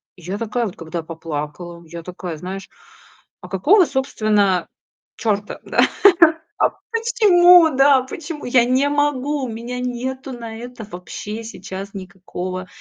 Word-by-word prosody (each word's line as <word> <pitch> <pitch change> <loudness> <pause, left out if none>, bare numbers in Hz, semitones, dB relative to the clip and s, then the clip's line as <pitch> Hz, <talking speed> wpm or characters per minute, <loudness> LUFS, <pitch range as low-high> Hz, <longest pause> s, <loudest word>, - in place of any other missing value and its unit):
И 180 - -17
я 190 +4 -4
такая 230 +1 -1
вот 195 - -6
когда 165 0 -5
поплакала, 165 +1 -6
я 170 +1 -8
такая, 180 -1 -7
знаешь: 190 +3 -7 0.7
"А 180 - -10
какого, 330 - +4
собственно, 215 - +1 0.5
чёрта, 210 -3 -2
да? - - -2 0.8
А - - +4 0.2
почему, 360 -8 +6
да? 270 -1 +5
Почему? 300 +3 -7
Я 245 -1 +4
не 260 +3 +2
могу. 290 -1 0
У 245 - -5
меня 235 +3 -5
нету 260 +2 -4
на 230 -2 -7
это 240 -2 -8
вообще 210 +4 -7
сейчас 195 -2 -8
никакого, 185 -1 -6
225 Hz, 135 wpm, -20 LUFS, 185-265 Hz, 0.8 s, почему